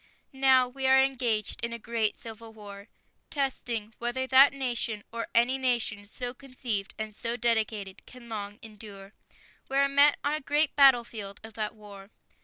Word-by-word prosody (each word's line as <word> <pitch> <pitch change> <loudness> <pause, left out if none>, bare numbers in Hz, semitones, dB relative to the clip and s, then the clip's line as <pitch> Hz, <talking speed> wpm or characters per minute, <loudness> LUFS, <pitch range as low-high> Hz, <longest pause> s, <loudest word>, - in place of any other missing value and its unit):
Now 265 -1 +4
we 265 +1 -3
are 265 0 +6
engaged 245 -7 0
in 235 0 -2
a - - -4
great 230 -2 -2
civil 225 0 -10
war.. 205 -1 -11 0.4
.testing 240 -6 -2
whether 240 +2 -2
that 265 +2 +7
nation, 240 -6 -3
or 230 0 -4
any 245 +3 +3
nation 235 -5 -1
so 245 +3 -6
conceived 250 -6 -4
and 215 -1 -5
so 235 +2 -3
dedicated... 220 -5 -1
can 250 -2 -13
long 205 -2 -6
endure. 205 -2 -11 0.6
We 270 - -1
are 280 0 +4
met 280 +1 +5
on 290 - 0
a 305 - -2
great 295 +2 +1
battlefield 235 -7 +3
of 220 0 -11
that 215 0 -4
war. 200 -2 -13
235 Hz, 165 wpm, -28 LUFS, 215-265 Hz, 0.6 s, that